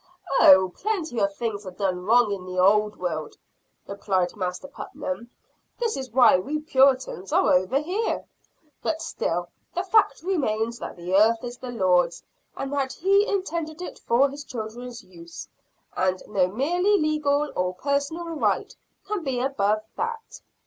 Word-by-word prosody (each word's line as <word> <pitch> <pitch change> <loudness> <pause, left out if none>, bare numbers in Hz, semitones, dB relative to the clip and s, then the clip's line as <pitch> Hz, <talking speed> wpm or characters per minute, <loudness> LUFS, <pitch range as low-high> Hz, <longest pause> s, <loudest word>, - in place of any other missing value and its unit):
"Oh, 190 -1 +7
plenty 355 - -2
of 200 0 0
things 220 -3 -3
are 190 - -6
done 180 -1 -2
wrong 230 0 +4
in 195 -2 -3
the 185 0 -7
old 210 +3 +4
world," 160 -4 -4 0.5
replied 190 -3 -1
Master 185 +4 -4
Putnam; 275 -3 -6 0.5
"that 465 -2 0
is 265 -1 -5
why 235 -5 +6
we 290 +11 -3
Puritans 265 - +2
are - - +4
over 185 +8 +2
here. 370 +9 -2 0.6
But 320 0 -2
still 175 +1 -2 0.3
the 360 - 0
fact 370 -7 +2
remains 235 - -1
that - - -6
the 175 +1 -5
earth 225 +4 +4
is 245 0 -7
the 255 - -7
Lord's 180 -6 +1 0.3
and 275 +1 -4
that 270 -2 -1
He 395 +3 +3
intended 335 -5 -2
it 360 - -7
for 250 +4 +3
His 285 +1 -8
children's 240 0 -7
use; 170 -2 -11 0.5
and 185 0 0
no 195 -3 +2
merely 350 - +1
legal 300 -1 +1
or 180 0 -1
personal 285 - -1
right 325 -2 -1 0.3
can 405 -3 -3
be 265 -4 -1
above 215 -5 0
that. 460 0 -5
245 Hz, 155 wpm, -25 LUFS, 190-305 Hz, 0.6 s, Oh